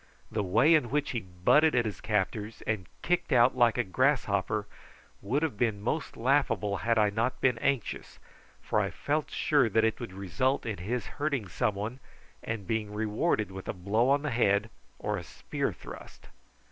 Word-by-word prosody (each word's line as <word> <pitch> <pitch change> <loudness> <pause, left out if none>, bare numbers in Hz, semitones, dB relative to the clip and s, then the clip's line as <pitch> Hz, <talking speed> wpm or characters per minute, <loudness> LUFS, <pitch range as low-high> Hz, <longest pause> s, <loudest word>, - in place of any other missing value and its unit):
The 110 - 0
way 110 - +4
in 150 -7 +3
which 145 +3 0
he 120 - -1
butted 95 - +3
at 120 -1 +3
his 105 - -4
captors, 105 +1 -2
and 105 -5 -2 0.2
kicked 180 -2 0
out 125 0 +5
like 120 -2 +4
a 125 - +2
grasshopper, 105 -3 +1 0.6
would 130 +10 0
have 150 -10 -1
been 110 -4 +1
most 130 +9 -3
laughable 120 -6 +1
had 115 +3 +1
I 105 -1 +4
not 115 +5 -1
been 125 -3 +2
anxious, 135 -4 -2 0.5
for - - +1
I - - 0
felt 150 +1 -2
sure 145 -7 +2
that 110 +2 +2
it 110 - 0
would 120 -6 -6
result 100 +8 -1
in 110 -6 -3
his 115 +6 -2 0.2
hurting 140 -8 0
some 100 +4 0
one, 110 +6 -4 0.4
and 110 -3 -4
being 110 -1 -2
rewarded 105 - 0
with 95 0 -8
a - - -2
blow 105 +7 +1
on 140 +1 +3
the 150 - -1
head 105 -2 +2 0.3
or - - -2
a - - -5
spear - - -3
thrust. - - -12
115 Hz, 185 wpm, -29 LUFS, 105-130 Hz, 0.6 s, out